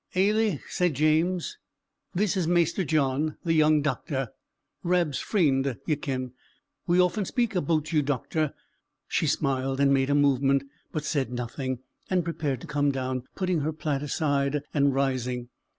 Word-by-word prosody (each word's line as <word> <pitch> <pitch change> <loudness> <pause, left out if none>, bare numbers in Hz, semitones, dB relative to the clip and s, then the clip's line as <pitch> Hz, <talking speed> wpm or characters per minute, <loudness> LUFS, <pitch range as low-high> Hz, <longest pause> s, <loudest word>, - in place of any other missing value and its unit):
"Ailie," 205 -3 +2
said 180 -5 0
James, 165 - +1 0.5
"this 200 +1 +1
is 180 -4 0
Maister 175 +2 +2
John, 150 -1 +1
the 165 - +1
young 155 -1 +4
doctor; 135 -4 -2 0.5
Rab's 175 -5 +1
freend, 135 - +1
ye 155 - +2
ken. 130 -3 -4 0.5
We 175 +1 +3
often 180 +3 +3
speak 235 +3 0
aboot 160 -2 0
you, 155 - +4
doctor." 145 +2 -1 0.5
She 160 - 0
smiled, 135 -2 0
and 140 0 +4
made 135 0 +2
a 145 - +3
movement, 140 -1 +3 0.3
but 155 -1 -3
said 135 -6 -1
nothing; 125 +1 -3 0.3
and 185 -2 +2
prepared 150 -6 -2
to - - -8
come 145 -1 +1
down, 130 -1 -3
putting 185 -3 0
her 150 +2 -1
plaid 150 -3 -2
aside 145 -1 0
and 140 -2 +3
rising. 125 -3 -1
150 Hz, 150 wpm, -27 LUFS, 135-170 Hz, 0.5 s, young